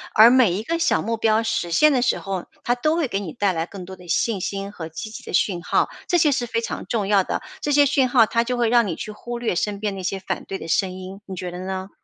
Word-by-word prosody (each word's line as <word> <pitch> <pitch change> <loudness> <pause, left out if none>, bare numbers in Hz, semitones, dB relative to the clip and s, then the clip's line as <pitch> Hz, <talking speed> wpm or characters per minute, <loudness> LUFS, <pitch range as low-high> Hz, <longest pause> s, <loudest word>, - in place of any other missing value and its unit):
而 220 +2 +9
每 245 -7 +5
一 200 +4 -3
个 335 +8 -2
小 160 - +2
目 230 +4 -2
标 220 0 +2
实 175 -6 -1
现 305 - +5
的 260 -3 +2
时 240 - +2
候， 195 -3 -4 0.2
它 245 - +1
都 310 +6 +1
会 310 -7 0
给 195 - -1
你 175 -6 -6
带 200 -1 +1
来 165 -2 -2
更 185 +1 -9
多 190 +1 -10
的 180 -1 -14
信 215 +4 +1
心 195 +2 -4
和 165 -5 -7
积 160 +7 -7
极 220 - -9
的 - - -9
讯 180 -4 +1
号， - - +1 0.2
这 350 - +3
些 310 -3 +4
是 245 -3 -1
非 230 - -1
常 - - -5
重 210 -4 -1
要 195 -3 +4
的。 - - -2 0.2
这 290 - -1
些 290 0 +6
讯 270 -2 +3
号 245 -2 +5
它 230 +2 0
就 250 - -1
会 235 -2 +1
让 235 -3 +4
你 165 - -2
去 215 - -6
忽 240 +3 -6
略 235 -4 -1
身 205 +3 -1
边 210 -2 -1
那 - - -5
些 190 +1 -2
反 - - -4
对 195 - -4
的 165 - -8
声 190 +1 +1
音， 185 +1 -8
你 190 - -6
觉 180 -1 -5
得 180 - -7
呢？ 190 0 -4
210 Hz, 315 characters per minute, -22 LUFS, 190-240 Hz, 0.2 s, 而